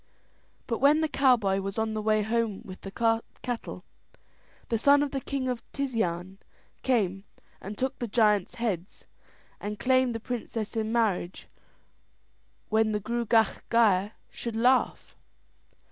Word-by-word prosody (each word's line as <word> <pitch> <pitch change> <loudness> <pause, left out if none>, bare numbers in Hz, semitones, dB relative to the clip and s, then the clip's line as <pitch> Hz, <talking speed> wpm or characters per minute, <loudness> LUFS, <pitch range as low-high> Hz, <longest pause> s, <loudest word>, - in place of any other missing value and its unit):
But 230 - -2
when 290 +3 +5
the 315 - +2
cowboy 240 -10 +3
was 195 +1 -5
on 220 0 0
the 215 - -2
way 215 0 +2
home 225 -2 -1
with 185 -1 -10
the 225 +3 +1 0.3
cattle, 245 -2 -5 0.9
the 230 - +1
son 285 +4 +5
of 285 - -3
the 270 - -2
king 270 -1 -3
of 250 -2 -2
Tisean 195 -9 -2 0.4
came 195 -7 +1 0.4
and 205 +2 -7
took 260 0 -2
the 240 - -2
giant's 210 -3 +2
heads 200 -6 -3 0.5
and 210 +1 -5
claimed 255 -1 +2
the - - -2
princess 230 -2 -4
in 220 -1 -1
marriage 205 -6 0 1.2
when 220 0 +2
the 210 - 0
Gruagach 230 +1 +1
Gaire 210 -3 +3 0.2
should 235 -2 -5
laugh. 250 +3 +2
225 Hz, 140 wpm, -28 LUFS, 205-245 Hz, 1.2 s, when